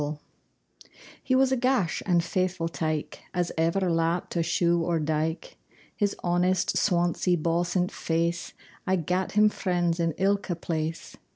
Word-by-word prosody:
LAUTH 145 0 -3 1.0
He 260 - +1
was 265 0 +4
a - - +3
gash 250 -8 +1
and 175 -2 +4
faithfu' 180 -1 -1
tyke 155 -2 -3 0.2
As 175 -1 0
ever 170 +4 +1
lapt 165 +1 0
a 170 - +2
sheugh 170 +1 +2
or 165 0 0
dyke. 155 +2 -2 0.4
His 205 -2 0
honest, 175 +1 +1
sawnsie, 175 -1 +1
bawsint 175 +3 0
face 170 +1 -2 0.3
Aye 190 - +3
gat 180 +2 -1
him 210 0 +5
friends 175 -4 -1
in 165 -1 +1
ilka 200 -1 +1
place. 165 -1 -4
175 Hz, 145 wpm, -27 LUFS, 165-185 Hz, 1.0 s, him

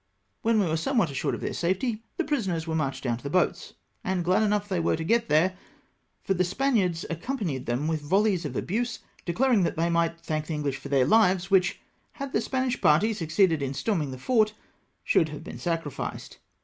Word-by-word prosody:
When 225 -1 +3
we 200 - +3
were 160 -1 0
somewhat 200 - +1
assured 135 - -1
of - - -8
their - - -3
safety, 215 +6 -1 0.2
the 350 - +1
prisoners 190 - -1
were 165 - -3
marched 140 -4 -2
down 120 -3 0
to 120 - -16
the 140 - -3
boats; 180 +1 0 0.3
and 180 -2 -1
glad 185 +4 +3
enough 210 -1 +1
they 190 -3 -1
were 165 - +1
to 160 - -4
get 230 +7 +1
there, 175 +5 +3 0.7
for 195 - +1
the 185 -1 +1
Spaniards 190 -4 0
accom 255 +12 -3
panied 140 - -3
them 125 +6 -1
with 160 -1 -1
volleys 190 +4 +2
of 140 -5 -5
abuse, 235 - -1 0.3
declaring 230 +4 +2
that 175 - 0
they 170 +1 +1
might 170 0 +1
thank 155 -2 -3
the 160 - -2
Enghsh 145 -2 -1
for - - -8
their 135 -2 +3
hves, 190 -4 +3
which, 185 -2 +3 0.3
had 275 -1 -6
the 220 - +2
Spanish 255 0 -1
party 180 +10 +4
succeeded 165 -3 +2
in 135 0 -2
storming 165 - -1
the 130 - -6
fort, 215 - +2 0.5
should 160 - +3
have 150 +1 -8
been - - -8
sacrificed. 165 -5 -4
175 Hz, 210 wpm, -27 LUFS, 155-215 Hz, 0.7 s, party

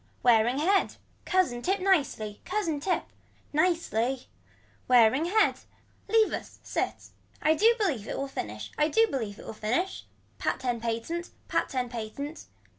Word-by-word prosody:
Wearing 240 +1 +4
head. 380 +6 +2 0.3
Cousin 360 -11 +1
tip 385 +8 +1
nicely. 285 - +1
Cousin 365 -7 -1
tip. 360 +5 0 0.5
Nicely. 270 - +1 0.6
Wearing 250 +4 +5
head. 425 +5 +3 0.5
Leave 440 +1 +3
us - - -6
sit. - - -3 0.3
I 310 - +4
do 450 +8 +5
believe 290 - -1
it - - -3
will 275 - -2
finish, 110 - -6
I 300 - +4
do 450 +9 +4
believe 225 - -4
it - - -11
will - - -6
finish. 245 - -2 0.3
Pat - - -1
ten 245 -2 -1
patent, 235 +10 -3 0.2
Pat - - 0
ten 255 -2 -1
patent. 240 +6 -6
280 Hz, 145 wpm, -28 LUFS, 230-365 Hz, 0.6 s, Wearing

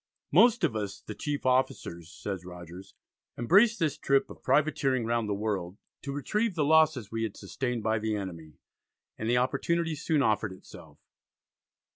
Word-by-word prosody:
"Most 225 +6 +5
of 150 -9 +2
us, 100 -2 -4
the 110 - -7
chief 145 +4 -4
officers," 125 -10 0
says 95 -1 -5
Rogers, 90 +1 -11 0.4
"embraced 205 - +4
this 155 -6 -1
trip 140 0 +2
of - - -12
privateering 135 -3 +1
round 115 -2 0
the 100 - 0
world, 100 -3 -3 0.2
to 140 - -5
retrieve 205 - -1
the 155 -4 +1
losses 155 -8 +3
we 115 0 -2
had 110 -3 -3
sustained 125 -4 -3
by 110 0 +1
the 110 0 -1
enemy," 85 -6 -6 0.7
and 110 - -2
the 120 - +3
opportunity 165 +6 0
soon 155 -1 0
offered 105 -3 +1
itself. 95 - -14
125 Hz, 160 wpm, -29 LUFS, 105-150 Hz, 0.7 s, Most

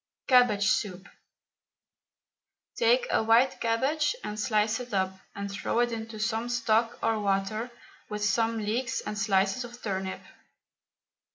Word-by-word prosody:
CABBAGE 245 -6 +4
SOUP. 190 -3 -1 1.7
Take 485 +1 +3
a - - +3
white 230 +4 +3
cabbage 275 - +1
and 210 0 -5
slice 215 +1 +1
it 245 -4 -5
up, 190 -1 +1 0.2
and 200 -1 -5
throw 200 - -2
it 240 0 +2
into 225 -1 -6
some 225 +2 -1
stock 230 -1 +1
or 225 -1 +1
water, 205 +3 -1 0.4
with 210 0 -2
some 225 +3 +1
leeks 225 +4 -1
and 210 - -5
slices 195 +2 +1
of 240 0 -10
turnip. 190 -2 -3
220 Hz, 130 wpm, -28 LUFS, 205-240 Hz, 1.7 s, CABBAGE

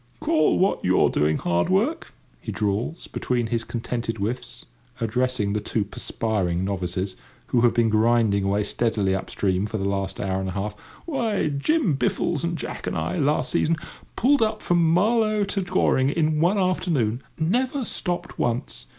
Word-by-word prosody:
"Call 155 -2 +2
what 190 +2 +1
you're 90 0 +3
doing 75 +1 +2
hard 85 0 0
work!" 220 - +1 0.3
he - - -6
drawls, 105 +10 -2
between 120 -2 -1
his 115 -1 0
contented 115 0 -3
whiffs, 110 +5 -4 0.3
addressing 115 -2 0
the 105 - 0
two 105 +1 -1
perspiring 95 -4 -2
novices, 95 -1 -2 0.3
who 120 - +3
have 120 -1 +3
been 115 -1 +3
grinding 110 -2 +3
away 100 +1 +1
steadily 105 -2 0
up 95 - -3
stream 95 0 0
for 110 - -3
the 95 - -2
last 100 -1 -2
hour 95 -1 -1
and 95 0 -3
a - - -4
half; 105 +2 -3 0.3
"why, 230 - 0
Jim 185 - +1
Biffles 145 +3 0
and 170 0 -1
Jack - - -6
and - - -2
I, 80 +3 -2
last 150 +2 +1
season, 165 - +2 0.4
pulled 280 +2 +3
up 215 -1 0
from 175 -1 +3
Marlow 215 +3 +3
to 200 0 -1
Goring 175 -7 +2
in 155 0 +1
one 180 +5 +3
afternoon—never 180 - 0
stopped 175 -3 -3
once. 120 +3 -2
120 Hz, 165 wpm, -24 LUFS, -, 0.4 s, you're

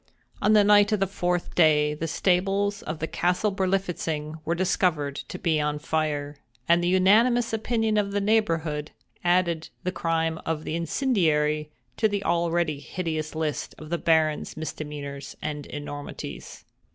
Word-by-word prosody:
On 210 +1 +4
the 210 -1 +6
night 205 0 +5
of 215 - +2
the 195 - +3
fourth 180 -2 -2
day, 150 -3 +4
the 155 +2 -4
stables 195 +4 +1
of 155 - -5
the 160 - -2
castle 180 +5 0
Berlifitzing 175 -5 -2
were 170 - 0
discovered 170 -5 +1
to - - -6
be 160 -4 +1
on 150 0 -1
fire; 150 -2 -2 0.3
and 170 +1 +4
the - - +1
unanimous 225 +6 +4
opinion 225 -1 0
of 200 -1 +1
the 205 - 0
neighborhood 165 -8 0 0.3
added 175 -2 +1
the 180 - -1
crime 165 -2 -1
of 160 -1 -2
the - - -4
incendiary 155 - +1 0.3
to 220 - +3
the 205 -1 -2
already 170 -3 +1
hideous 155 -1 -4
list 155 -2 -3
of 155 +1 -10
the 170 - 0
Baron's 160 -2 +1
misdemeanors 145 -3 -6
and 150 -2 -5
enormities. 145 -1 -7
165 Hz, 150 wpm, -26 LUFS, 155-195 Hz, 0.3 s, the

